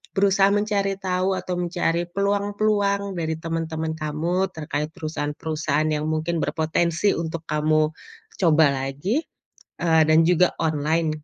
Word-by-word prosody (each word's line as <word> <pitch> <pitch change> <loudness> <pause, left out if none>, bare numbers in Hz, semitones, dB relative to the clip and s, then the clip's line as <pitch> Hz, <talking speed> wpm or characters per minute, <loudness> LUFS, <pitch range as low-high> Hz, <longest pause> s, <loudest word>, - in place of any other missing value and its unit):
berusaha 195 0 +4
mencari 200 -1 0
tahu, 185 0 0
atau 180 - -4
mencari 175 -1 0
peluang-peluang 200 0 0
dari 160 -1 -1
temen-temen 160 -1 -2
kamu 165 +5 -1
terkait 150 -1 -3
perusahaan-perusahaan 155 -1 -2
yang 150 +1 -2
mungkin 160 +2 -1
berpotensi 170 +4 +1
untuk 165 0 -4
kamu 155 0 +2 0.5
coba 160 -3 +5
lagi 140 - -2 0.6
eee, 160 -2 +4
dan 155 +1 +6
juga 180 0 +4
online, 155 +1 +1
165 Hz, 120 wpm, -23 LUFS, 155-195 Hz, 0.6 s, dan